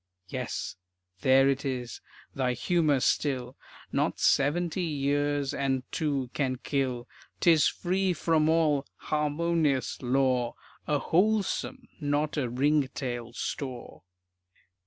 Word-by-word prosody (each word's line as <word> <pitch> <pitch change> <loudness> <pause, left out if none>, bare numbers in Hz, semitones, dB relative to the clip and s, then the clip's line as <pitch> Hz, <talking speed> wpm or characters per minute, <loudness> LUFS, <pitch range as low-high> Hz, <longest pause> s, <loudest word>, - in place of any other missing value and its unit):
Yes, - - -4 0.4
there 135 +4 +5
it 135 0 +1
is, 125 -4 -4 0.3
thy 130 -2 0
humor 150 0 +2
still, 130 -3 0 0.4
Not - - 0
seventy 170 +6 +2
years 145 -2 0
and 135 -2 0
two 140 -6 -1
can 130 -3 0
kill. 130 -2 -2 0.3
'Tis 165 -3 +5
free 190 +1 0
from 160 -2 +2
all 155 -4 +2
"harmonious" 150 -2 0
lore, 125 -1 +1 0.3
A 150 - +2
"wholesome" 215 - 0
not 145 0 0
a 135 -5 -1
"ringtail" 130 -3 -1
store. 130 -1 -5
145 Hz, 105 wpm, -28 LUFS, 130-155 Hz, 0.4 s, there